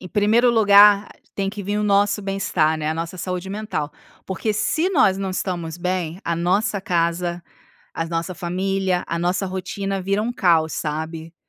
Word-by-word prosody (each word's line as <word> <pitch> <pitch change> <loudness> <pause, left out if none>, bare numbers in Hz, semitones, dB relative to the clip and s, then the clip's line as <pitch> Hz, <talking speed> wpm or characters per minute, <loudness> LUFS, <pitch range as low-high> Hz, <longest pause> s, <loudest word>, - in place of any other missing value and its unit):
Em 185 - -9
primeiro 220 +6 +3
lugar, 205 -2 +6 0.3
tem 195 -1 -1
que 205 0 -6
vim 205 +2 -2
o - - 0
nosso 205 +1 +2
bem-estar, 185 -5 0
né, 155 -1 -3
a - - -1
nossa 165 +2 -5
saúde 180 +1 -4
mental. 205 -8 -4 0.3
Porque 210 +3 -2
se 265 - 0
nós 215 - +4
não 195 -1 -2
estamos 175 -3 -3
bem, 180 -1 -2
a 170 - 0
nossa 195 +4 +1
casa, 175 -2 -1 0.5
a 165 - -2
nossa 165 +2 -3
família, 185 +1 -1
a 170 - -2
nossa 180 +3 0
rotina 195 +1 -3
vira 200 +2 0
um 235 +2 -1
caos, 170 -8 +2
sabe. 160 +2 -4
185 Hz, 170 wpm, -22 LUFS, 170-205 Hz, 0.5 s, lugar